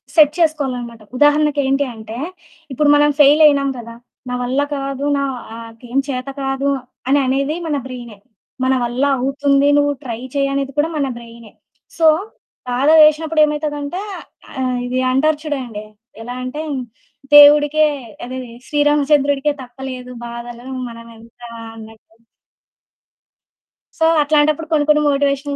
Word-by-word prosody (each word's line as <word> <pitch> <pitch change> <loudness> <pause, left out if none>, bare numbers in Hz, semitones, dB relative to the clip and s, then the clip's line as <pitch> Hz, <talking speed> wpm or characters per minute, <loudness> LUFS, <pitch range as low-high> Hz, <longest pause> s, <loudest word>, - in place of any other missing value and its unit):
Set 300 -3 +6
చేసుకోవాలనమాట. 255 -8 -1 0.2
ఉదాహరణకి 295 +1 +3
ఏంటి 275 +1 +1
అంటే 220 0 -9 0.6
ఇప్పుడు 290 +3 +1
మనం 295 0 +4
ఫెయిల్ 295 +2 +6
అయినాం 280 -2 +4
కదా! 230 -1 -9 0.4
నా - - -3
వల్ల 260 +3 0
కాదు 275 0 -4
నాకేం 240 -2 -5
చేత 255 -1 -4
కాదు 270 +1 -1 0.4
అని 280 +2 +3
అనేది 275 +4 0
మన 300 - -1
బ్రైనే. 240 -4 -9 0.5
మన 260 +1 +2
వల్ల 240 +3 -2 0.2
అవుతుంది 275 +2 +1
నువ్వు 290 0 +2
ట్రై 230 -3 -5 0.2
చెయ్యనేది 275 0 -1
కూడా 300 +2 +2
మన 280 -2 0
బ్రైనే. 230 -2 -13 0.5
సో 325 -1 +4 0.6
బాధ 250 +3 0 0.2
వేసినప్పుడు 310 +1 +3
ఏమైతదంటే 295 +2 -3 0.6
ఆహ్, 255 -1 -1
ఇది 250 +1 -2
అంటారు 295 +3 +2
చూడండి. 250 -8 -5 0.4
ఎలా 245 +2 -6
అంటే 255 +4 -5 0.7
దేవుడికే 295 +1 +7 0.4
అదే 255 +1 -6 0.3
'శ్రీరామచంద్రుడికే' 290 -1 +2
తప్పలేదు 255 0 -8 0.2
బాధలు 235 +1 -9 0.2
మనమెంత 230 0 -14 0.4
అన్నట్టు. 225 0 -15 1.8
సో 320 - +3 0.2
అట్లాంటప్పుడు 305 +1 +1
కొన్ని 300 -2 +2
కొన్ని 300 0 +5
మోటివేషన్ 280 0 0
275 Hz, 120 wpm, -18 LUFS, 245-295 Hz, 1.8 s, దేవుడికే